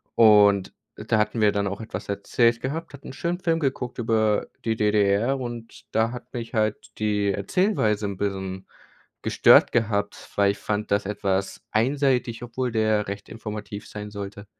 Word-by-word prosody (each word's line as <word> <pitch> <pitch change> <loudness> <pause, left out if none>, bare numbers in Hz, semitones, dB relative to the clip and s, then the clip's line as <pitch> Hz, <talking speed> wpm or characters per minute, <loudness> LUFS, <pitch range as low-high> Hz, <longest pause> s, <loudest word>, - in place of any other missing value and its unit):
und 105 -3 +5 0.2
da 110 +1 -1
hatten 110 +1 0
wir 105 -1 +5
dann 100 -1 -1
auch 100 +3 -4
etwas 100 -3 -6
erzählt 115 +4 +1
gehabt, 160 +5 -4
hatten 140 - -11
'n - - -8
schönen 170 +5 -2
Film 165 -3 +1
geguckt 130 -4 -2
über 110 -2 +1 0.2
die 110 -1 -1
DDR 105 +4 +2
und 120 -2 -7
da 110 +1 +1
hat 125 0 -9
mich 120 +1 -6
halt 110 -2 -1
die 105 -2 +1
Erzählweise 105 - +1
'n 100 -1 -3
bisschen 95 -1 -3 0.6
gestört - - +6
gehabt, 105 -3 -1
weil 100 -1 +4
ich 100 - -7
fand 105 0 -3
das 100 0 +2
etwas 100 -1 -2
einseitig, 125 0 +1
obwohl 125 +1 -3
der 110 -2 +1
recht 100 +1 -6
informativ 105 -2 -7
sein 105 0 -7
sollte. 100 0 -7
110 Hz, 165 wpm, -24 LUFS, 100-120 Hz, 0.6 s, gestört